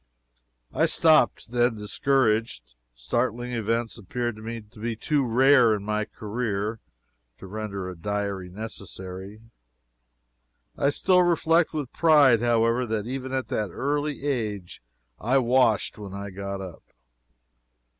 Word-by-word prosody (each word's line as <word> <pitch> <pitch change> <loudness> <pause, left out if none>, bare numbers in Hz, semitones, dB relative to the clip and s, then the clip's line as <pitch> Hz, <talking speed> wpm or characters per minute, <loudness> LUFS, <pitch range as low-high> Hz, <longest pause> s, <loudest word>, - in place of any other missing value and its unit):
I - - +3
stopped, 155 -7 +3
then, 120 -1 +2
discouraged. 110 - 0 0.2
Startling 120 - -2
events 115 0 -2
appeared 120 +3 -3
to 110 -1 -7
be 115 +1 -3
too 140 +3 0
rare, 125 -1 +5
in 100 - -6
my 105 0 -1
career, 105 -1 -3 0.6
to - - -11
render 100 -1 -5
a 90 - -6
diary 100 +1 -3
necessary. 95 0 -8 1.3
I 140 - +2
still 180 +5 +3
reflect 170 -1 +3
with 145 -5 -5
pride, 145 -8 +5
however, 120 +1 +2
that 110 -1 -2
even 130 +1 -5
at 130 -1 -2
that 105 -2 -1
early 145 - -2
age 105 -10 -3 0.4
I 125 +5 +2
washed 120 -5 +2
when 100 -2 -8
I 100 0 -6
got 100 +1 -5
up. 95 -3 -9
115 Hz, 125 wpm, -25 LUFS, 100-130 Hz, 1.3 s, rare